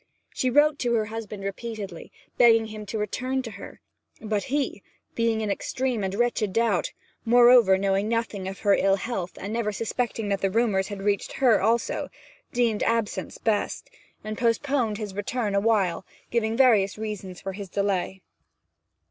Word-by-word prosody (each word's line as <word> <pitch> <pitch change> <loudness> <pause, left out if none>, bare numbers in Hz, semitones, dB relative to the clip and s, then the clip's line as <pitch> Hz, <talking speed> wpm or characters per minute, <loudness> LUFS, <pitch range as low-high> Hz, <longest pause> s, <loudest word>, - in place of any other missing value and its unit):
She 255 - 0
wrote 295 +3 +4
to 240 -1 +1
her 220 -1 +1
husband 215 -2 -7
repeatedly, 200 -2 -6 0.2
begging 225 -2 +5
him 215 -1 -8
to 220 - -3
return 255 +5 -2
to 230 - -7
her; 200 - -11 0.4
but 215 -2 -2
he, 275 -6 -2 0.3
being 230 -1 +1
in 210 -2 -1
extreme 250 +1 -2
and 190 0 -2
wretched 235 -3 0
doubt, 225 -5 +1 0.3
moreover, 240 -4 +6
knowing 195 +1 +1
nothing 225 -4 -2
of 195 0 -7
her 200 -1 +4
ill 195 0 +3
health, 190 -3 -4
and 200 +2 -5
never 225 -2 -1
suspecting 225 0 -2
that 200 -1 -1
the 195 - +2
rumours 200 -3 +1
had 200 -1 -6
reached 200 -1 0
her 250 -5 +3
also, 230 +1 0 0.4
deemed 235 -3 +1
absence 230 -2 -1
best, 215 -2 -1 0.3
and 215 0 -5
postponed 235 -1 +1
his 210 -3 -5
return 205 +2 -2
awhile, 200 -4 +1 0.3
giving 225 -1 0
various 220 -7 +4
good 215 - -10
reasons 195 -4 -6
for 195 - -5
his 200 -1 -7
delay. 190 -1 -1
215 Hz, 165 wpm, -25 LUFS, 200-235 Hz, 0.4 s, moreover